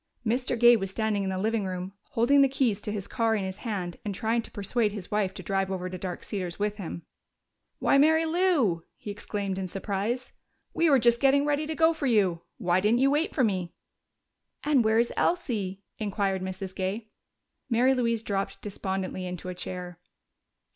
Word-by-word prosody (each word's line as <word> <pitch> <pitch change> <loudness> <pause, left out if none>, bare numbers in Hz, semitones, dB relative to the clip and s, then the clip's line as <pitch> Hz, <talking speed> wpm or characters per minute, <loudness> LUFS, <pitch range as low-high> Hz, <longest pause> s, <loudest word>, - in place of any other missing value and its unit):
Mr. 245 +2 0
Gay 240 +1 +8
was 195 -3 -2
standing 210 0 0
in 190 - -1
the 190 - -2
living 220 +2 0
room, 185 0 -4 0.2
holding 275 +5 +5
the 275 - +6
keys 245 -6 +1
to 210 - -4
his 205 -2 -4
car 225 -1 +1
in 205 - -1
his 190 0 -4
hand 195 -7 -4
and 205 -3 -3
trying 225 +4 +1
to - - -8
persuade 210 +2 0
his 200 -3 -7
wife 210 -3 +1
to - - -9
drive 195 -1 0
over 185 -1 -3
to 185 - -4
Dark 180 -1 -5
Cedars 180 -5 -4
with 210 0 -1
him. 170 -3 -6 0.7
"Why, 275 - +3
Mary 320 +2 +5
Lou!" 315 - +2
he 210 - -7
exclaimed 200 -2 -3
in 190 - -3
surprise. 200 +6 -3 0.4
"We 330 -1 +3
were 275 - +6
just 235 -1 +3
getting 275 +1 +4
ready 295 +1 0
to 315 - -3
go 325 +1 +4
for 315 -3 -2
you. 195 -8 +2 0.2
Why 175 0 +2
didn't 220 +5 +3
you 275 +1 +4
wait 300 +3 0
for 265 - +3
me?" 185 -6 -1 0.9
"And 290 -5 +3
where 220 0 +3
is 235 +1 +2
Elsie?" 205 - -1 0.2
inquired 200 -2 -1
Mrs. 185 0 -5
Gay. 205 +4 -3 0.6
Mary 250 +2 +4
Louise 230 -3 0
dropped 195 -2 -3
despondently 190 -2 -3
into 180 0 -6
a - - -3
chair. 180 -1 -6
210 Hz, 195 wpm, -28 LUFS, 190-240 Hz, 0.9 s, Gay